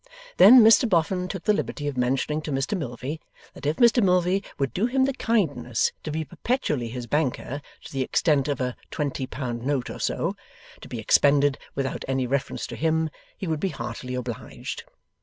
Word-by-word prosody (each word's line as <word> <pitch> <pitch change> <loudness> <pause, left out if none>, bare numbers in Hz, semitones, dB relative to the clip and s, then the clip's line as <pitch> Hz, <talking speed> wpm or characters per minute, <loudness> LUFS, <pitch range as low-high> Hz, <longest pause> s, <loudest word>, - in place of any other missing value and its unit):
Then, 255 0 +10
Mr 225 +2 +6
Boffin 180 +1 +1
took 185 -1 -6
the 210 - +3
liberty 145 -7 -3
of 145 - -2
mentioning 135 +5 0
to 155 - -5
Mr 135 +8 -1
Milvey 140 - -4 0.3
that 145 - -6
if 150 - +1
Mr 240 -1 +5
Milvey 180 +1 +2
would 135 -2 -1
do 210 +6 +1
him 260 +1 +2
the 275 - 0
kindness 190 - 0
to - - -5
be 155 +1 -2
perpetually 160 - -1
his 120 +1 -5
banker 145 0 -1 0.2
to - - -11
the 135 - -1
extent 145 +1 +2
of 145 -3 -1
'a 125 -1 -2
twenty 140 -3 -3
pound 120 -4 -4
note 135 -2 -1
or - - -8
so,' - - -1 0.5
to - - -10
be 120 - -6
expended 140 +5 +3 0.2
without 135 -1 -2
any 135 -1 0
reference 135 +2 -2
to - - -7
him, 160 0 0 0.3
he - - -5
would 160 -3 -1
be 195 - 0
heartily 120 -1 -5
obliged. 125 -3 -6
145 Hz, 190 wpm, -25 LUFS, 130-180 Hz, 0.5 s, Then